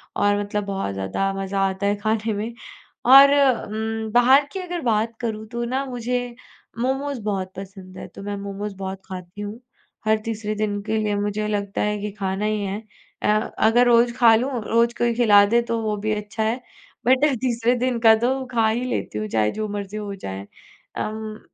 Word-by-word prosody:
और 205 0 +2
मतलब 205 0 -2
बहुत 195 - -3
ज़्यादा 95 - -1
मज़ा 195 0 -3
आता 190 +1 -4
है 205 - +2
खाने 215 +1 -1
में। 220 +3 -4 0.6
और 275 +1 +10
उम, 225 -5 0
बाहर 260 +4 +5
की 385 - -5
अगर 355 -2 -4
बात 225 -1 0
करूँ 220 -2 -3
तो 235 0 -3
ना 260 +3 -1
मुझे, 245 -1 -3 0.4
मोमोज़ 270 0 -1
बहुत 190 -3 -2
पसंद 190 -1 -10
है - - -7
तो - - -12
मैं 205 0 -3
मोमोज़ 200 +1 -5
बहुत 190 0 -5
खाती 185 +2 -8
हूँ। 205 +3 -6 0.5
हर 220 0 +3
तीसरे 215 -1 -3
दिन 205 -1 -1
के 220 +1 -1
लिए 210 -1 0
मुझे 205 +1 -1
लगता 200 -1 -2
है 210 0 0
कि 210 0 -4
खाना 195 +1 -1
ही 215 -1 0
है। 200 +1 -3 0.4
अ, - - 0 0.3
अगर 235 +3 +4
रोज़ 235 0 +4
खा 230 -2 +7
लूँ 255 +5 0
रोज़ 235 +2 +2
कोई 235 0 +1
खिला 205 -4 +6
दे 235 +3 +3
तो 230 - +1
वो 215 -1 -1
भी 215 - +2
अच्छा 210 +1 -4
है 225 +3 0 0.5
बट 260 +3 +4 0.2
तीसरे 240 -1 +1
दिन 245 -2 0
का 225 -1 +7
तो 265 +1 0
खा 230 -2 +2
ही 235 +3 -1
लेती 105 - -3
हूँ 105 - -3
चाहे 105 0 +1
जो 215 0 -3
मर्ज़ी 205 0 -5
हो 205 -1 -5
जाए। 95 - -7 0.5
अम, 215 0 -4
215 Hz, 195 wpm, -23 LUFS, 200-235 Hz, 0.6 s, और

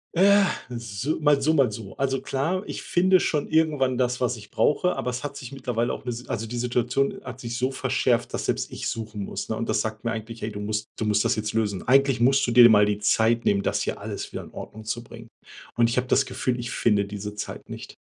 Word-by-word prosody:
Äh, 200 +3 +6 0.3
es 120 -2 -6 0.2
i 150 - +1
so - - -2
mal 150 -2 +4
so, 155 +3 +2
mal 135 -7 +3
so. 105 -3 -8
Also 135 -1 0
klar, 165 +8 -1
ich - - -6
finde 185 +1 +3
schon 150 -4 0
irgendwann 145 -6 +2
das, 125 0 +1
was 125 -1 0
ich 105 - -13
brauche, 180 +5 +2
aber 125 - -2
es 125 +2 -5
hat 145 -1 -5
sich 125 -1 -8
mittlerweile 125 -3 -2
auch - - -7
'ne 125 - -4
S 120 +1 -6
also 115 +1 -3
die 120 +2 -5
Situation 125 +2 0
hat 125 -1 -8
sich 120 -1 -5
so 130 +1 +1
verschärft, 130 -2 0
dass - - -2
selbst - - -1
ich - - -4
suchen 110 -2 -4
muss, - - -5
ne? - - -1
Und - - -4
das - - +2
sagt 110 +1 -5
mir 115 - +1
eigentlich: 115 +1 -6
„Ey, 110 - -3
du 105 - -6
musst 105 +1 -2
du 110 - -2
musst 105 0 +2
das - - +2
jetzt 105 0 -3
lösen. 105 -4 -1
Eigentlich 135 -1 +4
musst 135 +3 +4
du - - 0
dir 120 +1 +8
de 120 - +10
mal 105 -1 +6
die 105 - 0
Zeit 115 +3 +2
nehmen, 100 -1 +3
das - - 0
hier - - -3
alles - - -5
wieder - - -5
in - - -13
Ordnung 110 - -9
zu 115 +2 -4
bringen." 115 0 -12 0.5
Und 115 -1 +3
ich 120 - -2
habe 125 0 +1
das 135 +2 +3
Gefühl, 125 -1 -2
ich 120 - -4
finde 105 -3 +2
diese 105 +1 -6
Zeit 105 - -7
nicht. - - -8
120 Hz, 260 wpm, -25 LUFS, 110-135 Hz, 0.5 s, de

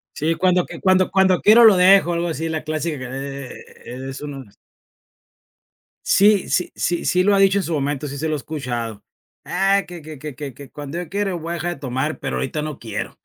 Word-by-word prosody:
Sí, 160 +3 0
cuando 180 0 +2
que - - -9
cuando 185 -1 +3
cuando 190 -2 +3
quiero, 225 +3 +7
lo 220 -3 +8
dejo 185 -1 +5
algo 170 +1 -1
así, 160 +1 -3
la 160 -1 -3
clásica, 155 0 -3 0.2
eh, 135 -1 -6 0.6
es 135 - -8
uno 145 -2 -7 1.6
Sí 205 -1 +4
sí 180 - 0
sí 175 -1 -1
sí, 180 0 +2
lo 205 +1 +4
ha - - +3
dicho 195 0 +4
en - - -2
su 170 - -3
momento. 145 0 -2
Sí, 140 0 -6
se 155 +3 -2
lo 155 - 0
he - - -2
escuchado: 120 -8 -5 0.4
"Ah, 195 +2 +1
que 175 -1 -9
que 155 -2 -10
que 150 -2 -7
que 140 0 -7
que 140 +1 -12
cuando 145 +2 -7
yo 175 -2 -5
quiera 200 -1 -1
voy 170 -1 -5
a - - -1
dejar 175 +1 -3
de - - -17
tomar, 135 +3 -3
pero 65 - -3
ahorita 65 - -3
no 150 -2 -5
quiero", 110 0 -6
160 Hz, 215 wpm, -21 LUFS, 140-185 Hz, 1.6 s, lo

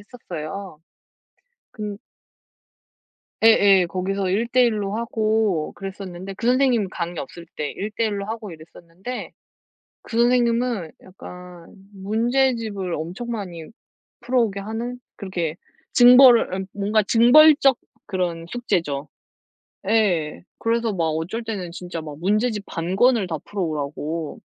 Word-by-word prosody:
했었어요. 190 -5 -8 0.9
그 210 -2 -6 1.5
예예. 200 -4 +6
거기서 185 +2 -2
1 215 +5 +1
대 250 +1 +4
1 220 -3 +1
로 200 +1 -3
하고 220 -7 0
그랬었는데 195 -1 -7
그 230 - -5
선생님 250 -5 +3
강의 170 -2 -5
없을 170 +5 -8
때 150 -1 -3
1 205 +2 -4
대 230 - +2
1 205 -2 -2
로 200 - -5
하고 220 -1 -6
이랬었는데 170 +8 -9 0.7
그 225 - -5
선생님은 235 -6 +2
약간 180 -2 -12 0.2
문제집을 220 -2 0
엄청 175 +10 -6
많이 185 -8 -5 0.6
풀어오게 240 -5 0
하는 225 +4 -5 0.2
그렇게 175 -6 -3 0.4
징벌을 245 -1 +8
예 - - -6
뭔가 210 +2 +1
징벌적 270 +5 +6 0.3
그런 175 -3 -2
숙제죠. 165 -12 -2 0.8
예. 180 -9 +1 0.2
그래서 230 -1 0
막 170 -3 0
어쩔 165 +9 -2
때는 195 -6 -5
진짜 175 -1 -6
막 150 -2 -9
문제집 210 +4 0
반 170 +3 -3
권을 235 -2 +3
다 160 -3 -3
풀어오라고 155 -3 -4
200 Hz, 240 characters per minute, -22 LUFS, 175-230 Hz, 1.5 s, 징벌을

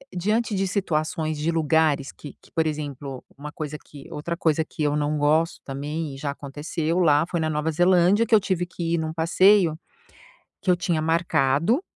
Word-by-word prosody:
diante 215 +5 0
de 195 0 0
situações, 155 -4 -1
de 150 +2 -1
lugares 155 -3 +1
que 145 - -11
que, - - -22
por 160 -1 +1
exemplo, 145 -3 -5
uma 150 +2 -8
coisa 150 -1 -5
que 140 -2 -13
outra 170 +3 -4
coisa 160 -2 +1
que 155 - -5
eu 145 0 +1
não 150 0 0
gosto, 155 +3 +2
também, 145 +2 -4
e - - -10
já 140 +1 -4
aconteceu 150 +4 -3
lá, 150 -3 +4
foi 175 - -2
na 160 -1 0
Nova 155 +1 -1
Zelândia, 180 +5 +4
que 225 - +5
eu - - +6
tive 185 -3 -1
que 170 -1 -3
ir - - 0
num 160 0 -2
passeio 170 +1 +4 0.9
que 190 - +1
eu 180 - +4
tinha 175 -2 -1
marcado, 165 - +2
160 Hz, 190 wpm, -24 LUFS, 150-175 Hz, 0.9 s, eu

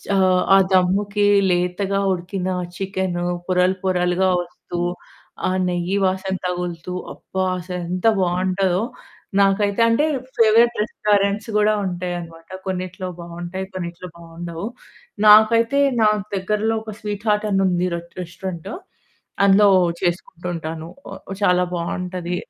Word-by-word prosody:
ఆహ్, 185 -1 +4
ఆ - - +8 0.2
దమ్ముకి 200 +3 +2 0.3
లేతగా 180 +3 0
ఉడికిన 185 +1 -4 0.3
చికెను 190 -2 -2 0.2
పొరలు 185 0 +2
పొరలుగా 180 0 +1
వస్తూ, 175 0 -7 0.7
ఆ - - 0 0.2
నెయ్యి 175 +2 -1
వాసన 190 0 -1
తగులుతూ 180 -1 -4 0.2
అబ్బా! 190 0 -4 0.2
అసలు 180 0 -5
ఎంత 180 +4 0
బావుంటదో. 185 +1 +1 0.6
నాకైతే 200 +2 +2
అంటే 230 +7 +3 0.3
ఫేవరైట్ 230 +2 +5
రెస్టారెంట్స్ 205 0 0
కూడా 210 0 +4
ఉంటాయి 180 -1 -3
అన్నమాట, 165 -1 -12 0.2
కొన్నిట్లో 185 0 -4
బావుంటాయి 175 +2 -6
కొన్నిట్లో 175 -1 -6
బావుండవు. 170 +1 -7 0.6
నాకైతే 230 +5 +6 0.2
నా 215 - +6 0.3
దగ్గరలో 210 +3 0
ఒక 215 -1 -7
స్వీట్ 210 -1 -5
హార్ట్ 210 0 +2
అని 195 0 +2
ఉంది 180 -1 +1
రెట్ 170 0 -9
రెస్టారెంట్ 170 0 -6 0.8
అందులో 200 +1 +6 0.3
చేసుకుంటూ 175 0 -3
ఉంటాను. 160 -1 -5 0.5
చాలా 180 -2 +4
బావుంటది. 180 +1 -3
185 Hz, 115 wpm, -21 LUFS, 175-200 Hz, 0.8 s, ఆ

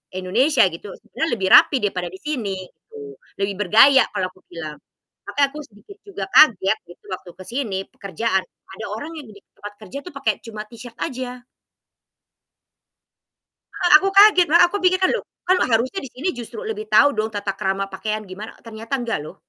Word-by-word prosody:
Indonesia 235 +9 +2
gitu 170 +5 -9
sebenernya 320 - -4
lebih 190 -3 -2
rapih 270 - +7
daripada 180 -3 -1
di 190 +2 -11
sini, 245 -11 -3
gitu. 425 - -13 0.2
Lebih 195 0 -2
bergaya 265 +6 +6
kalau 185 0 -2
aku 185 - -23
bilang, 155 -3 -8 0.5
tapi - - -7
aku 285 +2 -12
sedikit 215 - -17
juga 400 -2 -6
kaget 220 -7 +5
gitu 175 - -17
waktu 185 -1 -7
ke 185 - -8
sini 235 -6 -3
pekerjaan, 195 +1 -2 0.3
ada - - -6
orang 290 +9 -6
yang 290 - -9
di 200 - -16 0.2
tempat 205 0 -9
kerja 210 +6 -8
tuh 360 - -10
pakai 225 -6 0
cuma 215 -2 -7
t-shirt 235 0 -12
aja. 250 -1 -5 2.4
Heeh, 350 - +2
aku 390 +5 -1
kaget, 400 -4 +7
lah 340 - +6
aku 405 - -2
pikir 370 0 +3
kan, 370 - +4
"Loh 485 - -3 0.2
kan 370 0 +3
harusnya 250 - +1
di 270 - -8
sini 305 +9 -2
justru 245 - -8
lebih 435 -1 -5
tahu 285 -7 +5
dong 215 0 0
tata 200 -1 -2
krama 195 0 -2
pakaian 215 +3 -4
gimana," 200 +3 -9
ternyata 225 +3 -9
nggak 230 -7 -2
loh. - - -10
230 Hz, 180 wpm, -21 LUFS, 195-300 Hz, 2.4 s, rapih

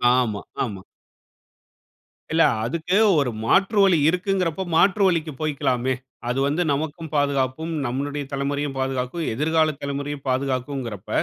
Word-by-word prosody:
ஆமா, 115 -5 0 0.2
ஆமா. 100 -6 -5 1.5
இல்ல, 165 0 +5 0.2
அதுக்கு 170 +8 -1 0.2
ஒரு 130 -4 0
மாற்று 195 - +3
வழி 185 -4 +5
இருக்குங்கிறப்ப, 180 -1 0
மாற்று 195 +5 +4
வழிக்கு 165 -3 0
போய்க்கலாமே. 130 -4 0 0.4
அது 125 +2 0
வந்து 150 +5 0
நமக்கும் 155 +2 -3
பாதுகாப்பும், 140 +2 0
நம்முளுடைய 145 +4 -2
தலைமுறையும் 140 0 -2
பாதுகாக்கும், 130 +4 -2
எதிர்கால 155 +1 +2
தலைமுறையும் 140 0 -4
பாதுகாக்கும்ங்கிறப்ப 130 -5 -2
145 Hz, 110 wpm, -23 LUFS, 130-160 Hz, 1.5 s, இல்ல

